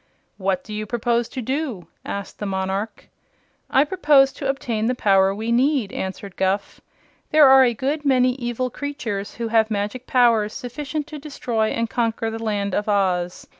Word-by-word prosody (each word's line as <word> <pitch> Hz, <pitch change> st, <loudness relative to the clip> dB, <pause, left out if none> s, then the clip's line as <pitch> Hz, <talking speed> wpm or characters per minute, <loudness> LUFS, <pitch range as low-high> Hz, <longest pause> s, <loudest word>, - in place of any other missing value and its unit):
"What 190 Hz, -2 st, -1 dB
do 215 Hz, -, -9 dB
you 215 Hz, 0 st, -4 dB
propose 235 Hz, +1 st, 0 dB
to 255 Hz, -, -5 dB
do?" 260 Hz, -, -3 dB, 0.2 s
asked 200 Hz, -1 st, -6 dB
the 205 Hz, -, -3 dB
monarch. 190 Hz, +2 st, -3 dB, 0.6 s
"I 270 Hz, -, +4 dB
propose 295 Hz, -5 st, +4 dB
to 275 Hz, -, -4 dB
obtain 230 Hz, -5 st, -1 dB
the 250 Hz, -, +1 dB
power 195 Hz, -4 st, +3 dB
we 220 Hz, +3 st, -3 dB
need," 250 Hz, -3 st, +2 dB
answered 190 Hz, 0 st, -5 dB
Guph. 190 Hz, +1 st, -1 dB, 0.5 s
"There 305 Hz, -2 st, +7 dB
are 265 Hz, 0 st, +8 dB
a 240 Hz, -2 st, +2 dB
good 285 Hz, +6 st, -2 dB
many 255 Hz, -3 st, +3 dB
evil 240 Hz, 0 st, -3 dB
creatures 225 Hz, -8 st, -5 dB
who 230 Hz, -1 st, -3 dB
have 220 Hz, -1 st, +3 dB
magic 210 Hz, +4 st, -3 dB
powers 230 Hz, -4 st, +3 dB
sufficient 295 Hz, +4 st, -5 dB
to 305 Hz, -1 st, -8 dB
destroy 245 Hz, -6 st, -2 dB
and 230 Hz, +1 st, -1 dB
conquer 225 Hz, -1 st, -1 dB
the 225 Hz, 0 st, -6 dB
Land 200 Hz, -3 st, -1 dB
of 210 Hz, +2 st, -1 dB
Oz. 185 Hz, -3 st, 0 dB
230 Hz, 170 wpm, -22 LUFS, 205-265 Hz, 0.6 s, are